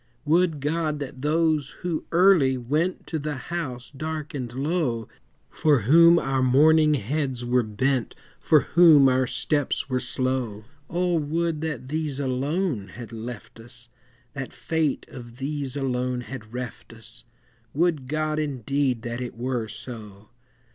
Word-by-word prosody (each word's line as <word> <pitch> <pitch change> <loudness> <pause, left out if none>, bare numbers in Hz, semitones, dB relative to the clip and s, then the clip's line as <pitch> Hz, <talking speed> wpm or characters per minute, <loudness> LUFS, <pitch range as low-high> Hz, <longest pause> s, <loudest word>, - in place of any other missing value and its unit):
Would 160 -1 +2
God 155 +1 -1
that 130 -2 -7
those 155 -1 +1
who 170 -3 -2
early 170 -7 +5
went 150 +9 -1
To 160 - -3
the 150 0 -3
house 130 -3 -5
dark 155 +1 -5
and 125 -4 -4
low, 135 -4 -1 0.4
For 150 -6 +3
whom 170 +9 +7
our 135 -4 0
mourning 150 +4 +5
heads 130 0 -2
were 125 +1 +3
bent, 120 +4 -1 0.2
For 155 -2 +4
whom 160 -6 +6
our 130 0 +2
steps 145 0 -1
were 130 - +1
slow; 125 -5 -2 0.3
O, 175 0 +1
would 160 +1 -1
that 145 -5 -4
these 150 -2 -2
alone 135 - -1
had 115 +4 -10
left 115 0 -8
us, 120 +1 -13 0.4
That 135 -1 -5
Fate 160 -3 -1
of 120 -2 -11
these 140 -1 -4
alone 125 -2 -1
had 120 -4 -9
reft 125 -1 -7
us, 115 +1 -12 0.5
Would 160 -4 +1
God 155 +1 -1
indeed 135 -3 -1
that 120 +1 -4
it 120 -2 -6
were 120 -2 -2
so! 105 -2 -9
135 Hz, 140 wpm, -25 LUFS, 125-155 Hz, 0.5 s, whom